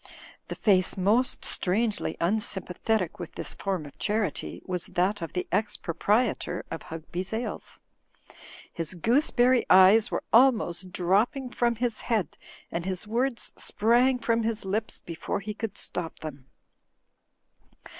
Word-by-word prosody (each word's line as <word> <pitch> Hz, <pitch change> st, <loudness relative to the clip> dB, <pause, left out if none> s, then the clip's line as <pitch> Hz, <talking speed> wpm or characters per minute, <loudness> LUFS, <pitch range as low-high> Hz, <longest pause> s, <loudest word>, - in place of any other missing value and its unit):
The -, -, -5 dB
face 190 Hz, -4 st, +3 dB
most 215 Hz, +7 st, +2 dB
strangely 210 Hz, +4 st, 0 dB
unsympathetic 190 Hz, 0 st, -1 dB
with 175 Hz, -, -7 dB
this -, -, -4 dB
form 190 Hz, -6 st, -3 dB
of 145 Hz, -, -13 dB
charity 205 Hz, -, -2 dB
was 180 Hz, -2 st, -3 dB
that 195 Hz, +4 st, 0 dB
of 165 Hz, -, -5 dB
the 180 Hz, -, -2 dB
ex 210 Hz, +3 st, 0 dB
proprietor 205 Hz, +8 st, 0 dB
of -, -, -4 dB
Hugby's 175 Hz, +3 st, -6 dB
Ales. 225 Hz, +2 st, -5 dB, 0.9 s
His 165 Hz, +2 st, -4 dB
gooseberry 245 Hz, -, +3 dB
eyes 190 Hz, +4 st, +7 dB
were -, -, -2 dB
almost 220 Hz, -8 st, +4 dB
dropping 220 Hz, -, +1 dB
from 240 Hz, -1 st, +1 dB
his 235 Hz, -1 st, -2 dB
head 215 Hz, -, -1 dB, 0.4 s
and 170 Hz, -, -2 dB
his 185 Hz, +1 st, -3 dB
words 240 Hz, +3 st, -1 dB
sprang 240 Hz, +4 st, +3 dB
from 230 Hz, -1 st, +1 dB
his 220 Hz, -2 st, -1 dB
lips 215 Hz, +3 st, -2 dB
before 165 Hz, +2 st, -4 dB
he 210 Hz, +2 st, -5 dB
could 220 Hz, -1 st, -5 dB
stop 175 Hz, -2 st, -4 dB
them. 140 Hz, -4 st, -8 dB
205 Hz, 135 wpm, -27 LUFS, 180-230 Hz, 0.9 s, eyes